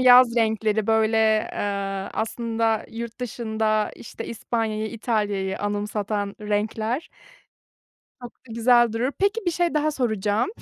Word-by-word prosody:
yaz 250 -1 +7
renkleri, 220 -2 +1
böyle, 220 -1 +3
ııı, 195 -1 -2
aslında 225 -1 -1
yurt 235 +1 -7
dışında, 220 -3 0
işte, - - -8
İspanya'yı 220 -1 -2
İtalya'yı 205 -4 -1
anımsatan 205 0 -2
renkler 215 +5 -1 1.1
çok 245 0 -8
da 235 - -14
güzel 240 0 +4
durur. 250 +5 0
Peki 405 +4 +2
bir - - +4
şey 345 -1 0
daha 305 0 +2
soracağım, 220 - 0
220 Hz, 120 wpm, -24 LUFS, 210-240 Hz, 1.1 s, yaz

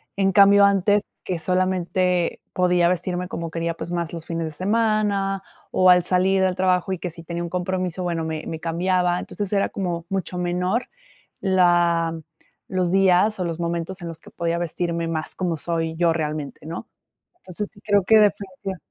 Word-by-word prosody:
En 195 -1 +2
cambio, 200 +1 +7
antes 200 +1 +3 0.2
que 180 - -2
solamente 180 0 0
podía 180 -1 +3
vestirme 180 0 -2
como 170 -2 -5
quería, 165 0 -2
pues, 170 - -6
más 170 -2 -2
los 165 -1 -6
fines 165 -1 -3
de 160 - -4
semana 200 +1 0 0.3
o 185 0 +4
al 180 -1 +6
salir 190 +2 +2
del 185 -1 +2
trabajo, 185 0 +1
y 185 - -2
que 180 - -4
si 165 0 -11
tenía 170 +1 -4
un 170 - -4
compromiso, 180 0 -2
bueno, 170 -2 -1
me 160 -1 -4
me 160 - -5
cambiaba. 175 +2 +1
Entonces, 205 -2 -5
era 200 -1 +2
como 175 -4 -3
mucho 190 -2 -3
menor 180 +6 0 0.6
la 175 -3 +3 0.5
los 185 -2 0
días 195 +2 +3
o 180 - -1
los 165 -1 -4
momentos 170 +2 -3
en 170 - -5
los 165 -1 -8
que - - -15
podía 170 0 -2
vestirme 170 0 -2
más 160 -1 -3
como 180 -3 -1
soy 165 0 -2
yo 170 0 +3
realmente, 150 -3 -4
¿no? 165 +2 -6 0.5
Entonces, 205 - -6
sí - - -19
creo 205 -2 +2
que, 220 +3 +6
definitiva 195 -2 0
180 Hz, 180 wpm, -23 LUFS, 170-190 Hz, 0.6 s, cambio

